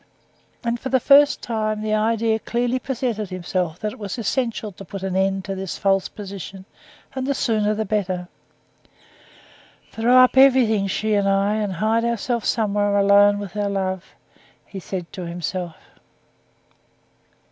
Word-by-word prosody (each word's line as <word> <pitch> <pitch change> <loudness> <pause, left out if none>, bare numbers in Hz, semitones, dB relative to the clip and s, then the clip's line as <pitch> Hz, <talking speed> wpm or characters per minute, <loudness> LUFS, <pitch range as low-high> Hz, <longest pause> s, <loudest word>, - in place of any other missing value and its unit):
And 235 0 -1
for 265 - -5
the 260 - +3
first 285 +3 +5
time 215 -2 -2
the 215 0 -1
idea 220 +1 +1
clearly 245 +3 -1
presented 240 -6 -3
itself 180 -2 -2
that 215 -1 -2
it - - -14
was 205 +2 -5
essential 230 -1 -2
to 195 - -12
put 195 +1 -8
an 190 -1 -2
end 195 0 0
to 195 - -3
this 190 -1 -5
false 195 -1 +1
position, 195 -2 -9 0.5
and 260 0 -3
the 280 - 0
sooner 215 -3 +1
the 220 +1 -2
better. 185 -3 -2 1.6
"Throw 240 +3 +3
up 255 0 +5
everything, 245 -7 +5
she 215 +3 -1
and 200 -1 +2
I, 195 +1 +2
and 205 -3 -2
hide 220 +6 +1
ourselves 235 0 -1
somewhere 205 -2 +1
alone 200 0 +5
with 205 -2 -7
our 205 -1 -1
love," 190 -2 -3 0.5
he 195 - -8
said 180 -1 -6
to 180 -2 -6
himself. 175 0 -4
205 Hz, 155 wpm, -22 LUFS, 195-230 Hz, 1.6 s, first